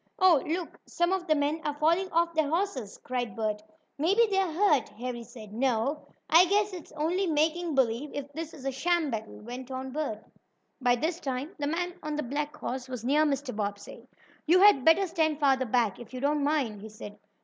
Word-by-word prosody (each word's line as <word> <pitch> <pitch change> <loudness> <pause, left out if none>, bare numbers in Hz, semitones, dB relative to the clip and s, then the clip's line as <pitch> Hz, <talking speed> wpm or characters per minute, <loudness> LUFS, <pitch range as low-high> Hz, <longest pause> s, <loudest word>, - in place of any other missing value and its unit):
"Oh, 360 -7 +5
look, 335 +2 -3
some 345 +1 0
of 375 -2 -2
the 310 - +4
men 295 +2 0
are 295 -1 -2
falling 335 +5 +2
off 335 +1 +2
their 315 -3 +1
horses!" 320 - -2
cried 245 -2 -3
Bert 215 -2 -2 0.4
"Maybe 390 +10 +4
they 385 - +3
are 375 -4 0
hurt," 315 - +2
Harry 240 +2 -6
said. 220 -3 -11
"No, 260 +4 0 0.2
I 335 +3 +7
guess 410 +1 +2
it's 355 -3 -9
only 350 +6 0
making 320 +1 +1
believe, 260 +2 +1
if 285 -1 -5
this 320 +1 -5
is 275 -3 -11
a 270 - 0
sham 320 +2 0
battle," 220 -1 -5
went 245 +3 -8
on 260 0 -5
Bert. 265 -7 -4 0.6
By 245 -1 +4
this 320 +7 -2
time 270 +4 -4
the 285 - -1
man 355 +3 -1
on 305 0 -3
the 300 - -2
black 290 +4 -3
horse 255 0 -4
was 250 -3 -6
near 295 +4 +4
Mr. 275 -4 -2
Bobbsey. 205 -1 -5 0.4
"You 350 +4 +6
had 400 -10 +7
better 325 +6 +5
stand 315 -4 0
farther 265 -3 +3
back, 225 -4 +1
if 240 +1 -10
you - - -4
don't 290 +2 +1
mind," 275 -9 0
he 220 - -8
said. 210 -1 -10
290 Hz, 205 wpm, -28 LUFS, 250-330 Hz, 0.6 s, I